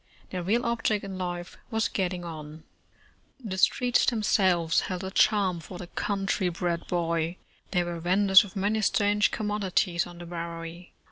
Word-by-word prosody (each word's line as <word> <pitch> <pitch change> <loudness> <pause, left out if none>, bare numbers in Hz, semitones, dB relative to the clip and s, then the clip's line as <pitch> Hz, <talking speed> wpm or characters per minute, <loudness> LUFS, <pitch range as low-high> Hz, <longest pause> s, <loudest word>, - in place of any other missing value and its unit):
Their 185 - -3
real 225 +8 +1
object 230 -3 0
in 190 -1 -6
life 175 -1 -5
was 225 -1 +1
getting 180 -2 -2
on. 155 -1 -8 0.8
The 200 -7 -5
streets 245 +4 +3
themselves 190 -7 +2
held 185 0 -3
a 190 - -4
charm 195 -4 +3
for 180 +2 -9
the 175 - -7
country 195 +1 -1
bred 170 0 -2
boy. 170 0 -1 0.3
There 180 -2 +1
were 170 -1 -4
venders 190 +3 +5
of 200 -1 -11
many 205 +3 0
strange 205 0 +3
commod 210 -1 -2
ities 180 -2 +1
on 175 0 -11
the 175 - -8
Bowery. 170 0 -7
185 Hz, 160 wpm, -27 LUFS, 175-205 Hz, 0.8 s, venders